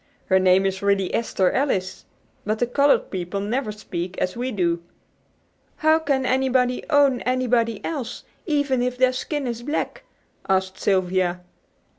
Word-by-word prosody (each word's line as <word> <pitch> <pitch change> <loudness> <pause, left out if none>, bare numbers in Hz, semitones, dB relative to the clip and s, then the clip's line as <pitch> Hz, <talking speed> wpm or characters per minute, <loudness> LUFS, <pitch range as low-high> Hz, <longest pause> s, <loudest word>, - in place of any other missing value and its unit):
Her 190 -1 +5
name 185 +1 +4
is 190 0 -1
really 200 -2 +1
Esther 195 -5 +1
Alice. 195 -10 -1 0.4
But 215 +1 -1
the 245 - +1
colored 280 +4 +2
people 185 +1 -3
never 215 +3 -2
speak 185 -3 -6
as 180 - -1
we 250 +2 -3
do." 170 -5 0 0.9
"How 315 +1 +3
can 280 -4 0
anybody 255 -1 +1
'own' 285 -4 +4
anybody 245 -3 0
else, 285 -8 -4 0.2
even 285 -5 +1
if 250 0 -1
their 255 0 +3
skin 290 +2 -3
is 235 -1 -3
black?" 295 - -3 0.5
asked 190 0 0
Sylvia. 185 -2 +1
235 Hz, 145 wpm, -23 LUFS, 190-265 Hz, 0.9 s, Her